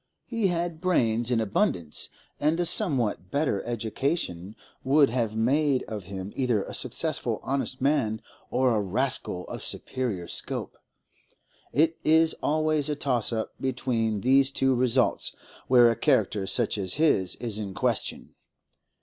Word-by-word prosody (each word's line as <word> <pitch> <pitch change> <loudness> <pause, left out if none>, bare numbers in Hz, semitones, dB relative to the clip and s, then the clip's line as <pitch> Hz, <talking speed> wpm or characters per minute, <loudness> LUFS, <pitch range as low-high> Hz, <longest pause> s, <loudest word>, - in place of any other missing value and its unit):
He 230 -4 0
had 170 -2 -2
brains 120 -10 +1
in 120 -2 +2
abundance, 90 -7 0 0.3
and 155 +3 +1
a 175 - +1
somewhat 130 - +1
better 140 -7 0
education 115 - -3 0.3
would 140 -1 +4
have 115 -3 -1
made 135 +4 +2
of 105 -4 -7
him 95 +1 -7
either 120 -6 +1
a - - -8
successful - - -1
honest 135 -1 -2
man 130 -6 +1 0.3
or 130 -1 +2
a 105 - +1
rascal 100 -2 -2
of - - -7
superior 110 -10 -3
scope—it 160 +2 -5
is 160 +1 +4
always 155 -1 +1
a 150 - 0
toss 125 -6 +1
up 110 -1 -3
between 115 -5 -1
these 135 +3 +4
two 135 -1 +2
results 125 0 +1 0.3
where 120 -2 +6
a - - -1
character 110 -6 +1
such 115 -2 +1
as 95 -2 -2
his 140 - +2
is 115 -3 -4
in 100 -3 -5
question. - - -1
125 Hz, 140 wpm, -26 LUFS, 110-145 Hz, 0.3 s, where